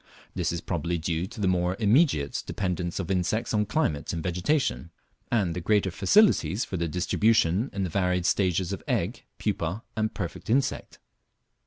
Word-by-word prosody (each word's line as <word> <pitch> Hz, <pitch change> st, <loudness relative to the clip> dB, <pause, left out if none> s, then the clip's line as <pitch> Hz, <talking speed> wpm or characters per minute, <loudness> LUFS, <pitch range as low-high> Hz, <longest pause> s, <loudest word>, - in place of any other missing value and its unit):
This -, -, -1 dB
is 85 Hz, 0 st, -3 dB
probably 85 Hz, 0 st, -2 dB
due 85 Hz, +2 st, -2 dB
to 110 Hz, -, -11 dB
the 100 Hz, -, +1 dB
more 90 Hz, 0 st, +1 dB
immediate 110 Hz, -, +2 dB
dependence 90 Hz, -3 st, -2 dB
of -, -, -3 dB
insects 95 Hz, +6 st, 0 dB
on 105 Hz, -1 st, +1 dB
climate 95 Hz, -, 0 dB
and 80 Hz, -2 st, -4 dB
vegetation, 90 Hz, -, 0 dB, 0.4 s
and 100 Hz, -8 st, +1 dB
the 90 Hz, -, -3 dB
greater 100 Hz, +1 st, +2 dB
facilities 110 Hz, -, +3 dB
for -, -, -5 dB
their 85 Hz, -1 st, -1 dB
distribution 95 Hz, -, +2 dB
in 100 Hz, -, -2 dB
the 90 Hz, -, -2 dB
varied 90 Hz, -1 st, +1 dB
stages 95 Hz, -1 st, +1 dB
of 100 Hz, -, -5 dB
egg, -, -, -1 dB
pupa, 90 Hz, +7 st, -2 dB
and 110 Hz, 0 st, 0 dB
perfect 90 Hz, 0 st, -5 dB
insect. 130 Hz, +4 st, 0 dB
90 Hz, 165 wpm, -27 LUFS, 85-105 Hz, 0.4 s, facilities